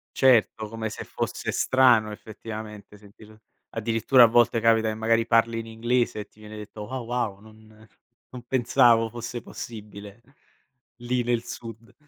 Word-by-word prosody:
Certo, 115 -4 +3
come 110 0 -5
se - - -7
fosse - - -4
strano 120 -5 +3
effettivamente 105 -1 -9
sentir 105 +1 -17 0.3
addirittura 115 +3 +3
a - - +10
volte 115 0 +3
capita 115 -1 +3
e 110 - -3
magari 115 +1 +1
parli 115 0 +2
in 115 - -7
inglese 120 0 -1
e 105 - -7
ti 110 - -27
viene 110 0 -11
detto: 105 0 -9
"Ah, 130 0 -4
wow! 115 -4 -3
Non 110 0 -18 0.4
non 125 -1 -10
pensavo 120 -2 +3
fosse 120 +1 -6
possibile, 105 -2 -10 0.8
lì 120 +1 -1
nel 120 -1 0
sud." 115 0 -9
115 Hz, 150 wpm, -25 LUFS, 110-120 Hz, 0.8 s, a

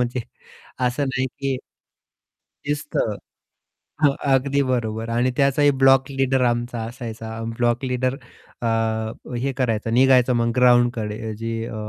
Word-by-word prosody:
म्हणजे 125 +1 -1 0.6
असं 125 +3 0
नाही 130 0 0
की 135 0 -3 1.1
शिस्त. 145 0 -3 1.1
हो, - - +8 0.3
अगदी 140 +2 +2
बरोबर 115 -3 -1
आणि 120 +2 +1
त्याचाही 140 +1 +4
ब्लॉक 135 0 +5
लीडर 135 -1 +1
आमचा 120 0 -1
असायचा 115 -1 -7 0.2
ब्लॉक 120 +2 +1
लीडर 130 0 0 0.5
अ, - - 0 0.7
हे 135 +3 -1
करायचा, 115 -3 0
निघायचा 125 +1 +4
मग 115 0 +1
ग्राउंडकडे 120 -3 +2
जे 115 0 -3
अ, - - -7
125 Hz, 120 wpm, -22 LUFS, 115-135 Hz, 1.1 s, हो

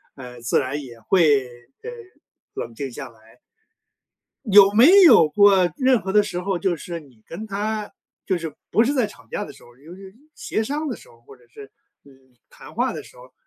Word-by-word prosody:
呃， 125 -2 -11
自 120 - +1
然 140 +2 -4
也 120 -3 -13
会， 145 - +2 0.4
呃， - - -6 0.6
冷 115 - -7
静 135 +1 -6
下 - - -8
来。 115 +1 -23 1.1
有 200 -3 +6
没 310 - +7
有 245 - +7
过 195 +1 +4
任 260 -4 +2
何 190 +1 -5
的 210 0 +5
时 180 -3 -5
候， 190 0 -2
就 185 -2 -1
是 170 +1 -7
你 130 -8 -21
跟 205 +7 -8
她 210 +1 -4 0.3
就 190 - 0
是 160 -3 -7 0.2
不 225 - +3
是 270 +4 0
在 255 -5 +1
吵 210 - -17
架 - - -4
的 - - -10
时 - - -19
候， 120 0 -19
由 160 +6 -14
于 190 +1 -14 0.2
协 220 - -3
商 295 +6 -4
的 255 - -4
时 - - -18
候， 115 - -21
或 135 +3 -16
者 125 -2 -25
是， 135 +2 -14 0.3
你， 140 - -19 0.4
谈 - - -15
话 - - -1
的 - - -8
时 - - -18
候， - - -17
185 Hz, 225 characters per minute, -21 LUFS, 135-215 Hz, 1.1 s, 没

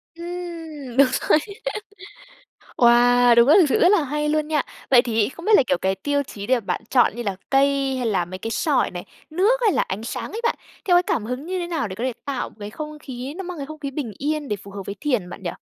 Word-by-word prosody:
Ừm, 335 -6 -7
đúng 275 0 +7
rồi. 305 - +4 1.4
Wow, 245 0 +5
đúng 235 +1 +6
rồi, 300 - +7
thực 340 - +5
sự - - +2
rất 350 - +6
là 400 -7 +3
hay 300 +2 -2
luôn 305 0 0
nha! 300 -3 +1 0.3
Vậy 245 -2 +7
thì 225 -3 +1
không 335 +5 -11
biết 435 - +2
là - - +5
kiểu 275 - +1
cái 190 0 0
tiêu 285 +9 -1
chí 205 -7 -8
để 255 -1 +2
bạn 195 -4 -3
chọn 250 -4 +4
như 240 - -3
là 200 -4 -3
cây 275 -1 +2
hay 250 -2 -2
là 190 -5 +1
mấy 185 +2 -8
cái 225 +4 -5
sỏi 270 +6 +1
này, 175 -1 -7 0.3
nước 405 +10 +2
hay 430 - +4
là - - +2
ánh 200 +4 -4
sáng 230 - -5
ấy 450 - -4
bạn, 470 - +2 0.3
theo 355 -3 +4
cái 355 - +5
cảm 230 -10 -1
hứng 250 +6 -5
như 370 +1 -2
thế 350 - -3
nào 330 -9 -2
để 185 - -6
có 235 - -3
thể 255 - 0
tạo 275 -3 -3
một - - -22
cái 205 0 -6
không 305 +5 -7
khí, 265 0 -7
nó 385 - -4
mang 360 -1 -6
cái 280 - -5
không 310 +1 -9
khí 280 -2 -4
bình 265 -6 -4
yên 300 0 -2
để 210 - -1
phù 200 0 -13
hợp 200 0 -7
với 200 - -4
thiền 245 -11 -1
bạn 190 - -9
nhỉ? 175 - -2
270 Hz, 270 wpm, -22 LUFS, 230-310 Hz, 1.4 s, đúng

